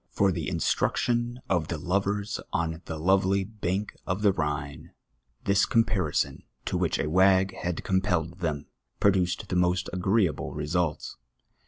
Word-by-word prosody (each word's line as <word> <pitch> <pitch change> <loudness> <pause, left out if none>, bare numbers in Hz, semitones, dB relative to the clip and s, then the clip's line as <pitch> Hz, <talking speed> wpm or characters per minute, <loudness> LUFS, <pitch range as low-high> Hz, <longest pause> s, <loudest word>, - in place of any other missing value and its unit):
For 100 -1 +2
the 85 -5 -3
instruction 120 +1 0
of 85 -5 +1
the 85 - -3
lovers 100 +4 -1
on 80 0 -1
the 80 - -5
lovely 95 +3 +2
bank 100 -1 -3
of 95 +3 -2
the 100 - +6
Rhine, 75 -3 -4 0.5
this 100 0 +3
comparison, 105 -9 +1 0.2
to - - -2
whicli - - 0
a - - -2
wag 95 +3 +4
had 90 -1 -3
compelled 95 -3 0
them, 75 -4 -2 0.3
produced 95 -3 +2
the 90 - -1
most 90 0 +1
agreeable 95 -1 +1
results. 80 0 -2
95 Hz, 140 wpm, -27 LUFS, 85-100 Hz, 0.5 s, the